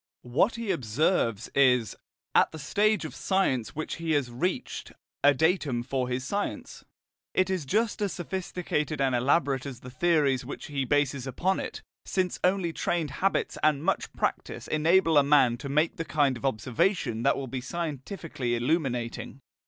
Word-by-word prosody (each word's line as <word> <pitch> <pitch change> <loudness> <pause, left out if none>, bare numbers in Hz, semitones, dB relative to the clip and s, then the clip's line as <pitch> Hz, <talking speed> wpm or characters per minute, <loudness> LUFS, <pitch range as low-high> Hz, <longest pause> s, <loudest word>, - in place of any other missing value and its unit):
What 130 - +2
he 230 -3 -2
observes 120 - 0
is, 125 -5 +3 0.4
at - - +4
the 160 - -8
stage 210 +8 +1
of - - -6
science 160 - 0
which 155 - -4
he 165 -1 -1
has 140 -5 0
reached, 175 +10 -3 0.3
a 145 - +8
datum 155 -6 +1
for 130 0 -2
his 125 +1 -2
science. 200 +9 -4 0.5
It 185 0 +2
is 185 -6 -1
just 215 - 0
as 200 -2 0
sophisticated 175 -4 -3
and 135 -2 +2
elaborate 135 +2 +1
as 125 -3 -8
the 125 - -10
theories 145 -3 +2
which 130 - -7
he 140 -3 -2
bases 140 -1 +1
upon 185 +8 0
it, - - -6 0.2
since 185 -2 -1
only 180 -2 +2
trained 160 -4 -1
habits 195 +7 0
and 150 -1 +2
much 195 +3 0
practice - - -3
enable 165 0 +4
a - - +4
man 140 -4 +4
to 140 - -7
make 155 +4 +1
the 165 - -2
kind 145 -4 +1
of 120 - -7
observation 125 - 0
that 140 +3 +2
will 140 - -3
be 130 0 -5
scientifically 150 -3 -4
illuminating. 125 -1 -1
145 Hz, 165 wpm, -28 LUFS, 130-175 Hz, 0.5 s, a